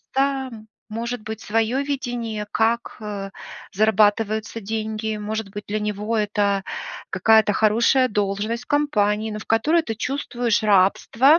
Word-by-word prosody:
там 265 -5 -1 0.2
может 235 +2 -3
быть 220 0 -6
своё 225 +5 +1
видение, 240 -6 -3
как, 230 +2 0
э, 200 -2 -5 0.4
зарабатываются 215 +1 +2
деньги, 220 +1 -3
может 215 0 -3
быть, 205 +1 -7
для 215 +1 -1
него 210 +2 -2
это 205 -2 +1 0.5
какая-то 220 +2 +4
хорошая 230 +5 +3
должность 210 +3 -1
в - - -45
компании, 220 -7 +1
но 210 - -4
в 215 - -9
которой 300 +10 +3
ты 225 -7 -4
чувствуешь 240 -2 -1
рабство. 215 - +4
220 Hz, 130 wpm, -23 LUFS, 210-235 Hz, 0.5 s, какая-то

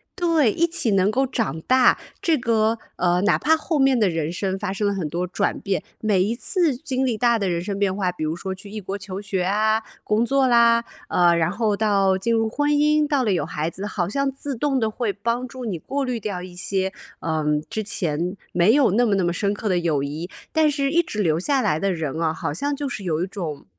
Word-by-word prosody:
对， 330 - +3
一 335 - +2
起 330 -8 0
能 195 +1 +3
够 265 +4 +1
长 225 -10 -2
大， 255 +7 +4 0.2
这 330 -2 +2
个， 225 -1 +1 0.2
呃， 180 0 +1
哪 205 - +3
怕 315 +4 +3
后 315 0 -2
面 270 -3 +3
的 205 - +3
人 165 -2 -2
生 190 +2 -2
发 195 -1 -3
生 205 +1 -1
了 - - +1
很 185 -6 -2
多 175 +4 -3
转 200 +3 -1
变， 195 -2 -2 0.2
每 205 -4 +2
一 220 +4 -1
次 335 +1 +2
经 265 -1 -2
历 245 -3 0
大 235 -1 +3
的 200 -3 -1
人 170 -2 -1
生 195 +1 -3
变 200 -2 +1
化， 190 -3 0
比 175 -3 -6
如 155 +1 -1
说 190 +2 -5
去 195 +2 -12
异 215 0 -5
国 195 +1 -4
求 195 -1 -6
学 195 -3 -2
啊、 215 +3 +1 0.2
工 215 +2 +1
作 270 +1 +2
啦， 235 -1 +5 0.3
呃， 175 -1 +4
然 170 +1 +1
后 210 0 0
到 195 -3 +2
进 230 +5 0
入 225 -1 +1
婚 290 +5 0
姻， 300 +1 +3
到 285 -3 +1
了 215 - +1
有 180 - 0
孩 155 +2 -3
子， 190 +4 -6
好 180 -4 -2
像 275 +5 0
自 270 +1 -5
动 270 +2 0
的 220 -2 +1
会 220 -1 -2
帮 235 +5 -2
助 255 0 -8
你 200 -6 -2
过 275 - -3
滤 250 -3 -2
掉 200 -4 -4
一 180 -1 -10
些， 190 +1 -1 0.3
呃， 160 -2 -2 0.2
之 220 - -3
前 175 -2 -2 0.2
没 175 +5 +4
有 280 -2 +4
那 240 +4 +3
么 215 - +1
那 195 -2 +2
么 175 - +1
深 200 +3 0
刻 210 +1 -3
的 185 - +2
友 165 -5 0
谊， 150 +6 -5 0.2
但 315 -1 +3
是 280 -1 0
一 340 +4 +3
直 215 -11 -3
留 160 -4 +1
下 270 +8 +1
来 155 -9 +1
的 195 +1 0
人 160 -2 -3
啊， 160 -1 +1
好 150 - -3
像 285 - -2
就 285 0 -3
是 215 -5 -6
有 165 -2 -1
一 - - -2
种， 170 -8 -6
205 Hz, 265 characters per minute, -23 LUFS, 180-255 Hz, 0.3 s, 啦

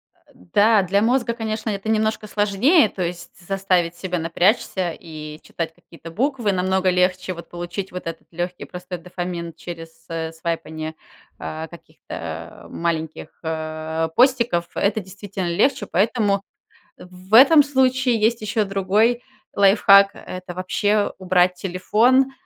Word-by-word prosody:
А, - - -36
да, 205 - +3
для 200 +2 +1
мозга, 235 0 +1
конечно, 220 -1 -3
это 200 +1 -4
немножко 220 0 0
сложнее, 210 - +3
то 190 - -5
есть 175 0 -4 0.2
заставить 185 -3 0
себя 180 0 -3
напрячься 175 +1 +1
и 155 -2 -9
читать 165 -1 -5
какие-то 165 -1 -13
буквы. 240 - 0
Намного 185 0 +1
легче 185 +1 +1
вот 170 - -11
получить 175 +2 -6
вот 180 -1 -7
этот 165 0 -6
легкий, 175 +1 -4
простой 180 0 -7
дофамин 175 -1 -5
через, 165 0 -10
э, 165 -1 -4
свайпанье, 160 -1 -4 0.4
а, 160 +1 -5
каких-то 170 0 -9
маленьких, 160 -2 -3
э, 160 0 -3
постиков. 235 -9 +3
Это 205 +2 +1
действительно 190 -1 -6
легче, 260 +11 +1
поэтому 200 0 +1 0.6
в 180 +1 -15
в - - -10
этом 285 +6 +8
случае 260 -3 +2
есть 225 +2 +2
еще 215 0 0
другой 205 +5 +1 0.3
лайфхак- 200 0 +6
это 185 -1 -8
вообще 205 +3 0
убрать 180 -1 +2
телефон, 220 +9 +2
185 Hz, 135 wpm, -22 LUFS, 170-215 Hz, 0.6 s, этом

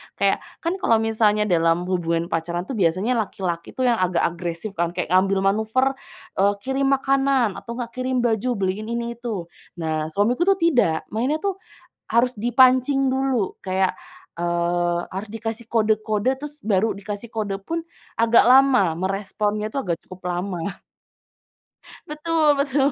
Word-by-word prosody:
Kayak, - - +2 0.2
kan 335 +2 0
kalau 230 - +4
misalnya 215 -1 +2
dalam 170 -2 +2
hubungan 170 -2 -1
pacaran 170 +2 -2
tuh 260 - -6
biasanya 185 +7 +1 0.2
laki-laki 170 -3 -5
tuh 260 - -1
yang 235 -4 +2
agak 180 -1 +1
agresif 170 +4 -3
kan, 170 -2 -1
kayak - - -3
ngambil 190 +1 +3
manuver, 220 +6 +1 0.4
eee, 200 +1 +4
kirim 270 +1 0
makanan, 270 -4 +2
atau 235 - -8
nggak 235 -1 -4
kirim 255 0 -1
baju, 235 +1 +1
beliin 195 +3 -2
ini, 235 0 -2
itu. 225 -7 -4 0.3
Nah, 155 -1 -1
suamiku 220 - +1
tuh 390 - +4
tidak, 245 - +2
mainnya 255 +8 0
tuh 395 -2 0 0.6
harus 240 +2 +3
dipancing 255 +4 +4
dulu. 260 -6 0
Kayak, 190 0 0 0.4
eee, 175 0 0
harus 195 +3 -5
dikasih 225 +1 -5
kode-kode 215 0 +1
terus 295 0 -8
baru 215 -1 +1
dikasih 205 +3 -7
kode 205 -3 -2
pun 330 +7 -2 0.4
agak 230 0 +5
lama, 255 -8 +5
meresponnya 205 +3 -2
tuh 275 - -1
agak 170 -1 0
cukup 185 0 -11
lama. 180 +1 -3 1.3
Betul 305 -1 +1
betul. 280 0 +2
215 Hz, 145 wpm, -23 LUFS, 185-255 Hz, 1.3 s, agak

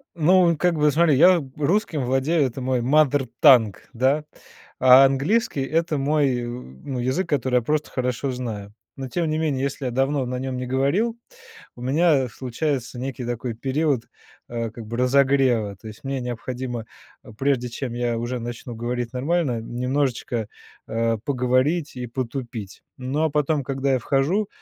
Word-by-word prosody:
Ну, 170 0 +4
как 175 +2 +2
бы, 150 -1 +3
смотри, 155 -2 +4
я 175 +3 +6 0.2
русским 155 -2 0
владею, 135 +4 +2
это 130 +2 -7
мой 130 -1 0
mother 140 0 +3
tongue, 120 - +7 0.2
да, 135 +5 +2 0.6
а 130 +1 +8
английский- 145 - +1
это 160 +2 0
мой, 140 -2 +1
э, - - -4
ну, 125 - -7
язык, 130 +10 -1
который 130 -3 0
я - - +2
просто 150 +5 -1
хорошо 125 +1 -2
знаю. 110 -5 -5 0.2
Но 135 -1 -5
тем 170 +1 -1
не 155 - 0
менее, 140 -4 0
если 140 0 -3
я 125 - -1
давно 135 +2 0
на 125 0 -3
нём 130 -1 -3
не 125 - -3
говорил, 170 - +1 0.6
у 120 - -12
меня 140 -1 +2
случается 130 +1 -3
некий 130 -1 -4
такой 120 0 -3
период, 135 0 0 0.5
а, 115 -1 -3
как 115 -1 -9
бы 115 - -5
разогрева. 125 -5 +2
То 110 - -12
есть 110 - -11
мне 135 -1 -2
необходимо, 125 -1 -5 0.5
прежде 135 -3 +1
чем 120 0 -5
я 120 -1 -1
уже 120 +2 -3
начну 120 +1 -6
говорить 120 +1 -3
нормально, 140 -2 0
немножечко, 125 -2 -2 0.4
а, 115 0 0
поговорить 135 +4 +1
и 125 -1 -4
потупить. 120 -4 -6
Но, 135 +5 -1
а 160 - +1
потом, 150 -1 +1
когда 135 +1 -1
я 130 - +2
вхожу 155 - +1
130 Hz, 165 wpm, -23 LUFS, 120-150 Hz, 0.6 s, а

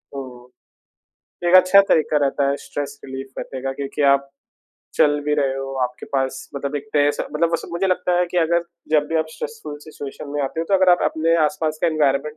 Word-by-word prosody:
हुँ। 125 -2 -9 1.0
एक 175 - +4
अच्छा 185 +2 +7
तरीका 155 -1 +3
रहता 140 0 +1
है 140 - +1
स्ट्रेस 145 0 -6
रिलीफ़ 135 0 -7
रखने 130 - -6
का 135 - -2
क्योंकि 140 +1 -4
आप 140 0 0 0.7
चल 145 -1 +3
भी 150 - +1
रहे 140 -3 +1
हो, 135 0 -5
आपके 125 0 -4
पास 135 -1 -2
मतलब 140 +1 -3
एक 145 0 -6
तय 145 -1 +4
स - - -5
मतलब 165 +2 +2
वो 165 - +2
स - - -9
मुझे 175 +3 0
लगता 180 -1 0
है 180 - +3
कि 180 - -4
अगर 170 +1 +2 0.3
जब 150 -1 +3
भी 165 - 0
आप 160 - 0
स्ट्रेसफुल 455 - -7
सिचुएशन 150 -2 -9
में 145 0 -2
आते 140 +4 -3
हो - - -1
तो 195 - +3
अगर 185 -1 +5
आप 175 - +4
अपने 165 +1 +1
आस-पास 155 +1 -1
का - - +4
एनवायरनमेंट 150 -1 +1
150 Hz, 220 wpm, -21 LUFS, 140-165 Hz, 1.0 s, अच्छा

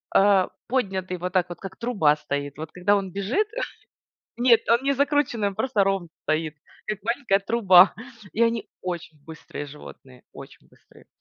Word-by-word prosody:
э, 195 -1 +5 0.2
поднятый, 190 -7 -1
вот 180 +1 -4
так 185 -2 +2
вот, 175 - -8
как 195 -1 -9
труба 205 -12 +2
стоит. 145 -1 -4
Вот 155 0 -7
когда 190 +3 +2
он 195 -2 -4
бежит, 225 - 0 0.9
нет, 240 -2 +5
он 235 +2 +4
не 280 +1 +2
закрученный, 280 -6 +1
он 200 - -7
просто 215 -3 +1
ровный 195 -3 -1
стоит, 155 0 -1 0.3
как 215 -2 -3
маленькая 235 -4 +1
труба, 195 -3 +5 0.4
и 230 - +1
они 230 -1 +1
очень 170 -4 -6
быстрые 155 -2 -8
животные, 135 -3 -13
очень - - -13
быстрые. - - -22
195 Hz, 160 wpm, -24 LUFS, 170-230 Hz, 0.9 s, э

